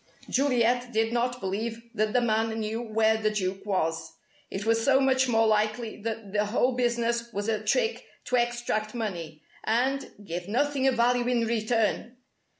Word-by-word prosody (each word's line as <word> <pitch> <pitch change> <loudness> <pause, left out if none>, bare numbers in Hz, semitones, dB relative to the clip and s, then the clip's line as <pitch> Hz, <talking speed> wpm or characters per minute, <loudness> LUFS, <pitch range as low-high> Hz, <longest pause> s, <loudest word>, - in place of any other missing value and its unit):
Juliet 245 -2 +2
did 225 0 +1
not 245 +1 0
believe 225 +3 -3
that 215 -1 0
the 250 +1 +3
man 225 -1 0
knew 220 +2 -2
where 220 -1 +2
the 215 -1 +1
Duke 195 -2 -2
was. 165 -4 -1 0.4
It 195 +2 -5
was 225 0 +2
so 270 +1 +4
much 260 -1 +3
more 225 -2 +3
likely 215 +1 0
that 220 -2 -5
the 210 0 +2
whole 245 +4 +2
business 235 -1 0
was 205 -1 -3
a 220 -2 -1
trick 485 -1 +1 0.2
to 250 - 0
extract 240 -2 -1
money 170 -9 -5 0.2
and 260 +5 0
give 175 0 -5
nothing 270 +4 +1
of 265 - +3
value 240 +1 +2
in 240 -2 +2
return! 225 +1 0
225 Hz, 165 wpm, -27 LUFS, 215-245 Hz, 0.4 s, so